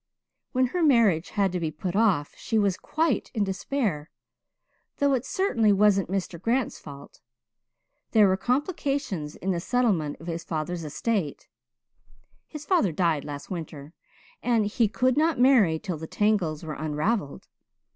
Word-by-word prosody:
When 255 0 +2
her 360 - 0
marriage 230 - +3
had 200 -3 +1
to 180 - -2
be 165 -2 -1
put 175 +4 -5
off 195 -10 +2
she 225 - -2
was 200 -3 +2
quite 315 - -1
in 215 - +2
despair 190 - -2 0.9
though 280 -1 +2
it 260 0 -1
certainly 240 - +2
wasn't 200 -2 +3
Mr. 185 -3 -3
Grant's 240 +3 0
fault. 140 -1 -12 0.9
There 215 -2 +5
were 190 - +3
complications 260 - -2
in 190 - -2
the 175 - -1
settlement 190 -8 0
of 165 - -11
his 165 -1 -4
father's 165 +2 -3
estate 165 +2 -2 1.0
his 300 -1 -9
father 315 - +2
died 160 -3 +1
last 145 +2 -7
winter 160 -3 -7 0.5
and 230 -3 +2
he 220 +2 +1
could 255 +5 +1
not 315 -3 +2
marry 240 -11 +5
till 180 -1 -5
the 160 - -7
tangles 190 -8 0
were 155 -1 -5
unravelled. 155 +3 -2
195 Hz, 150 wpm, -26 LUFS, 160-245 Hz, 1.0 s, There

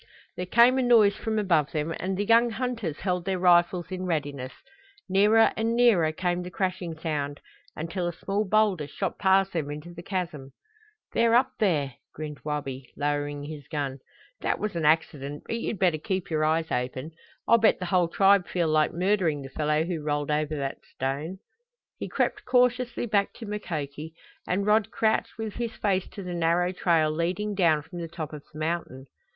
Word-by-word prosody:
There 180 - -4
came 240 +6 +5
a - - +3
noise 225 -5 +5
from 220 -1 -2
above 170 -8 +2
them 155 +1 -1
and 190 0 -2
the 205 - 0
young 230 +2 +5
hunters 230 - -3
held 180 -2 -1
their 190 0 -1
rifles 175 0 +3
in 185 0 -4
readiness. 145 -5 -2 0.6
Nearer 210 +4 +4
and 225 +1 0
nearer 215 -10 +4
came 175 +2 -1
the 180 - -6
crashing 180 -2 -3
sound, 145 -3 -3 0.4
until 170 +3 -3
a - - -1
small 200 +5 -1
boulder 205 -6 +2
shot 195 +5 -4
past 195 -1 +3
them 155 -4 -2
into 150 +4 -7
the 170 - -9
chasm. 170 -7 -4 0.6
"They're 230 0 +4
up 245 - +4
there," 150 - +1 0.2
grinned 150 -1 -6
Wabi, 135 -4 -4
lowering 145 0 -1
his 145 -2 -8
gun. 140 -3 -3 0.4
"That - - 0
was 210 -3 -3
an 165 -2 -1
accident, 150 -2 +1
but 230 - -3
you'd 230 - -3
better 175 -4 +2
keep 190 0 -3
your 155 -1 +1
eyes 160 +1 +1
open. 130 +4 -3 0.4
I'll 230 - +6
bet 220 - +4
the 180 - -4
whole 180 -1 +2
tribe 195 +1 +4
feel 170 -3 0
like 155 0 +3
murdering 175 -5 +1
the 135 - -8
fellow 150 +2 0
who 170 -2 -3
rolled 145 0 -1
over 155 0 0
that 135 -2 -4
stone!" 140 +7 -3 0.6
He - - -5
crept - - -1
cautiously 250 -1 +2
back 205 -3 +1
to 230 - -9
Mukoki, 160 -7 -5 0.3
and 195 +2 0
Rod 210 0 +3
crouched 220 -1 0
with 220 -2 -5
his 235 -2 -3
face 190 -3 0
to 200 - -9
the 180 -1 -5
narrow 170 +1 +1
trail 165 -4 +2
leading 180 +6 -1
down 165 -6 +3
from 175 +3 -9
the 170 - -4
top 160 -2 -6
of 150 -1 -8
the 155 - -12
mountain. 155 -5 -3
175 Hz, 185 wpm, -27 LUFS, 150-200 Hz, 0.6 s, I'll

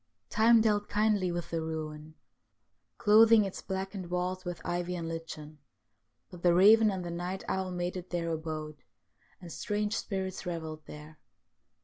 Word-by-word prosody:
Time 225 +1 +5
dealt 210 -2 +1
kindly 205 -3 +2
with 175 0 -4
the 165 -1 -1
ruin, 155 -1 -6 0.8
clothing 220 0 +6
its 195 - -6
blackened 190 -1 -5
walls 180 +1 -2
with 175 -2 -5
ivy 175 +1 -2
and 170 -2 -4
lichen; 155 -2 -7 0.7
but 180 -2 -11
the 175 -1 +4
raven 215 +4 +7
and 190 -3 -3
the 170 - -4
night 180 +2 -4
owl 190 -1 -1
made 180 0 -3
it 180 0 -7
their 170 -1 -2
abode, 155 -2 -5 0.6
and 175 -2 -10
strange 210 +3 -2
spirits 190 -4 -3
revelled 160 -3 -5
there. 150 +1 -11
180 Hz, 150 wpm, -30 LUFS, 165-195 Hz, 0.8 s, raven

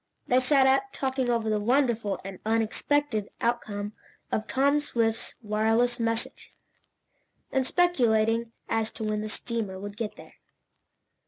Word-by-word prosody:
They 250 - +4
sat 265 +1 +4
up, 270 +1 +4
talking 260 -2 -1
over 230 -2 +1
the 215 -1 +1
wonderful 235 -3 +1
and 195 -2 -7
unexpected 225 +1 0
outcome 210 -3 -2 0.4
of 215 - -1
Tom 280 +2 +3
Swift's 230 -6 -1
wireless 225 +3 +2
message, 230 0 -2 1.0
and 265 -1 +1
speculating 230 -10 +2 0.2
as 225 -1 0
to 220 - -6
when 215 0 -1
the 215 - -4
steamer 215 -4 -3
would 205 +1 -7
get 215 -2 -3
there. - - -14
230 Hz, 135 wpm, -27 LUFS, 215-260 Hz, 1.0 s, They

